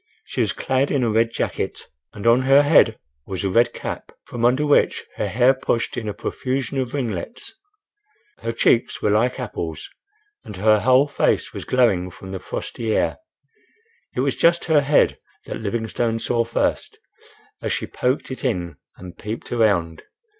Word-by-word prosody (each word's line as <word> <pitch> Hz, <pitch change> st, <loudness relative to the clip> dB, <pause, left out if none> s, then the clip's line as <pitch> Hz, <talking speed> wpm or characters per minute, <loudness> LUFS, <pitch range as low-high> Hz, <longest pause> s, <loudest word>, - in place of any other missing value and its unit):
She -, -, -2 dB
was -, -, +1 dB
clad 130 Hz, +1 st, 0 dB
in 135 Hz, -3 st, +1 dB
a 115 Hz, -, +1 dB
red 115 Hz, +1 st, +3 dB
jacket, -, -, -3 dB, 0.3 s
and 105 Hz, -, -9 dB
on 120 Hz, +2 st, +5 dB
her 135 Hz, +2 st, +5 dB
head 145 Hz, -7 st, +5 dB, 0.3 s
was 95 Hz, -1 st, -4 dB
a 95 Hz, -, 0 dB
red 120 Hz, +4 st, +4 dB
cap, -, -, -6 dB
from 120 Hz, -1 st, -6 dB
under 130 Hz, +5 st, +3 dB
which 145 Hz, -, +2 dB
her -, -, -1 dB
hair 125 Hz, +3 st, +4 dB
pushed 130 Hz, -3 st, -2 dB
in 110 Hz, -3 st, -3 dB
a -, -, -3 dB
profusion 135 Hz, +3 st, -3 dB
of 130 Hz, +1 st, -3 dB
ringlets. 225 Hz, -, -4 dB, 0.9 s
Her 115 Hz, -, -3 dB
cheeks 115 Hz, +1 st, +1 dB
were 105 Hz, -, +3 dB
like 120 Hz, +5 st, +1 dB
apples, 85 Hz, -10 st, -5 dB, 0.5 s
and 105 Hz, -, -9 dB
her 105 Hz, +3 st, +4 dB
whole 130 Hz, +5 st, +4 dB
face 145 Hz, -, 0 dB
was -, -, -7 dB
glowing 100 Hz, -8 st, +2 dB
from 95 Hz, +2 st, -11 dB
the 95 Hz, -, -4 dB
frosty 110 Hz, +3 st, -3 dB
air. -, -, 0 dB, 1.0 s
It -, -, +1 dB
was -, -, 0 dB
just 170 Hz, 0 st, +3 dB
her 155 Hz, -3 st, +4 dB
head 145 Hz, +1 st, +3 dB, 0.3 s
that -, -, -6 dB
Livingstone 115 Hz, +1 st, -1 dB
saw 115 Hz, +1 st, 0 dB
first, 115 Hz, -, -1 dB, 0.6 s
as -, -, -2 dB
she -, -, -1 dB
poked 130 Hz, +2 st, -2 dB
it 130 Hz, -, -6 dB
in 90 Hz, -10 st, -2 dB, 0.2 s
and 90 Hz, -1 st, -10 dB
peeped 110 Hz, +2 st, -6 dB
around. 95 Hz, -9 st, +1 dB
115 Hz, 170 wpm, -22 LUFS, 105-130 Hz, 1.0 s, on